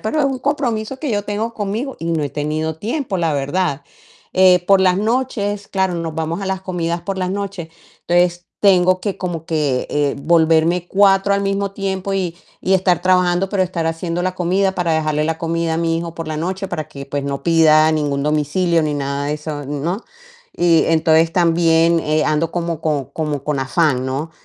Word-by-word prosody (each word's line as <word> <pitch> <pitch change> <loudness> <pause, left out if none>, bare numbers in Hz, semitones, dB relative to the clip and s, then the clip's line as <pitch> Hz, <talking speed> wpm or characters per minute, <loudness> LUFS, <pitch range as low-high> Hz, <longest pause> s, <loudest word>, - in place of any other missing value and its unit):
pero 300 +8 -1
es - - +2
un 270 -2 -1
compromiso 255 -3 -2
que 295 -5 -2
yo 205 -1 0
tengo 215 +3 -3
conmigo 220 +6 -3
y 165 - -5
no 160 - 0
he 145 - -3
tenido 155 +1 -2
tiempo, 225 - -3
la 165 -2 +1
verdad, 145 +1 -1 0.5
eh, 180 -1 +5
por 195 -1 +6
las 185 0 +3
noches, 210 -3 -1
claro, 190 -2 0
nos 165 -2 -4
vamos 160 +3 -3
a 195 - -4
las 190 -1 -2
comidas 175 -2 -2
por 195 -1 -4
las 185 0 -1
noches, 195 -4 -4 0.4
entonces 175 0 +2 0.2
tengo 185 -2 +4
que, 200 -3 -3
como 170 -3 -4
que, 150 -5 0
eh, 145 -1 0
volverme 165 +2 +2
4 195 0 +4
al 200 - 0
mismo 195 0 -1
tiempo 195 0 -3
y 180 -3 -2 0.2
y 190 - +2
estar 180 -2 +2
trabajando, 180 0 +2
pero 195 -1 +1
estar 175 -3 -2
haciendo 165 +1 -2
la 185 0 -1
comida, 190 +2 +1
para 175 -2 0
dejarle 155 -1 0
la 160 0 -2
comida 165 0 -1
a - - -1
mi 165 0 0
hijo 170 0 -6
por 165 - -5
la 155 -1 -3
noche 190 +4 -3
para 155 -4 -4
que, 140 -1 -9
pues 140 0 -3
no 140 -1 -3
pida 160 -2 +5
ningún 145 -3 -1
domicilio 155 +3 +1
ni 150 -1 -1
nada 140 0 -2
de 150 - -1
eso, 150 -1 -6
¿no? 160 - -3 0.5
Y, 170 -2 +3
entonces 160 0 +3
también, 165 -1 +3
eh, 155 0 0
ando 155 +2 0
como 170 -2 -3
con 150 -4 -1
como 150 -3 -3
con 150 -2 -1
afán, 135 -2 +1
¿no? 140 +5 -3
170 Hz, 200 wpm, -19 LUFS, 155-190 Hz, 0.5 s, por